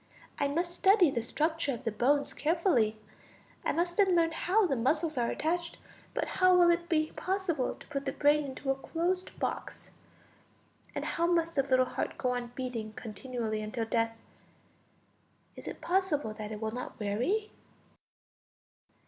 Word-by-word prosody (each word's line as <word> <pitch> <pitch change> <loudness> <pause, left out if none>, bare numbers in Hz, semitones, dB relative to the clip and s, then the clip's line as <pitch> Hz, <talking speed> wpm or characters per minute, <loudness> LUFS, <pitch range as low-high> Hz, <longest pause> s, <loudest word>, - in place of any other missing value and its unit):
I 285 - +2
must 345 +5 -1
study 380 -3 +5
the 235 - -1
structure 305 +3 0
of 235 - -11
the 225 - -1
bones 280 +7 +2
carefully. 295 - +2 0.7
I - - +1
must 345 +1 -1
then 385 -3 +4
learn 330 -1 +3
how 385 +6 +2
the 290 -7 +1
muscles 305 +6 +1
are 240 -2 +1
attached; 335 +2 -2 0.4
but - - 0
how 370 -1 +4
will 350 -1 +6
it 340 0 -1
be 310 -2 +1
possible 365 -8 -1
to - - -15
put 280 -2 -4
the - - +1
brain 295 +2 +3
into 270 0 -3
a - - +1
closed 345 +6 -2
box? - - -4 1.0
And - - -2 0.3
must 335 0 0
the 275 - +3
little 260 -1 +3
heart - - -3
go 250 - 0
on 245 -1 -2
beating 235 -4 -4
continually 220 0 -4
until 225 +2 -3
death? 230 0 0 1.4
Is - - -10
it - - -6
possible 330 - 0
that 215 0 -7
it 210 - -5
will 220 0 -2
not 250 +2 -6
weary? 250 - 0
290 Hz, 160 wpm, -31 LUFS, 240-345 Hz, 1.4 s, will